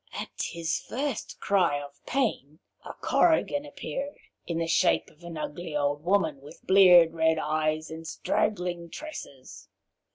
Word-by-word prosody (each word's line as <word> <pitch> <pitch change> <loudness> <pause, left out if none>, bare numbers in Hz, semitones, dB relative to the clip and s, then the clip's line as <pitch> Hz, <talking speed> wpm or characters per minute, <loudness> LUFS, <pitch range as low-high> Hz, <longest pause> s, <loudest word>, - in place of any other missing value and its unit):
At - - -5
his 170 -2 -2
first 270 0 -4
cry 180 -7 +2
of 140 0 -11
pain 210 - -1 0.3
a - - -8
Korrigan 295 -3 +2
appeared, 280 0 -5 0.3
in 170 - -2
the 165 - 0
shape 165 - +2
of 155 - -23
an 170 -2 -7
ugly 155 +1 -5
old 145 0 -1
woman 165 -7 +1
with 145 +4 -14
bleared 180 -4 +7
red 160 -1 +2
eyes 155 0 -1
and 160 0 -7
straggling 175 -3 -1
tresses. 160 - -9
170 Hz, 140 wpm, -27 LUFS, 155-200 Hz, 0.3 s, bleared